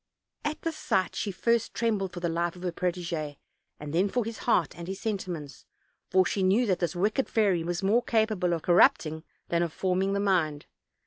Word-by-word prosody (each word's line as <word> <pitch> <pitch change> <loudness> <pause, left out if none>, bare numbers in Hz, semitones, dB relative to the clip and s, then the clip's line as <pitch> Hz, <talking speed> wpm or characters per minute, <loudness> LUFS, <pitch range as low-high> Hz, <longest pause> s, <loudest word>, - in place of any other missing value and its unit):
At 300 +1 -3
this 330 -1 -2
sight 185 -9 0
she 210 - -2
at 190 - -6
first 235 +1 +1
trembled 210 -5 0
for 175 - -6
the 175 - 0
life 170 +1 -1
of 180 - -11
her 180 - -1
protege, 170 -4 -3 0.4
and 150 0 -7
then 185 +4 +2
for 245 +1 0
his 230 0 -6
heart 180 -7 +2
and 170 0 -8
his 190 +1 -5
sentiments, 185 -9 -4 0.5
for 185 0 +4
she 195 - -1
knew 195 +6 +3
that 190 -5 +1
this 175 -2 -1
wicked 210 +8 0
fairy 195 -7 +2
was 175 +2 -3
more 215 +5 +3
capable 215 -6 +1
of 165 - -3
corrupting 160 -2 +4 0.3
than 170 0 +1
of 170 -2 0
forming 190 +3 0
the 200 - 0
mind. 170 -7 +1
185 Hz, 205 wpm, -28 LUFS, 170-210 Hz, 0.5 s, for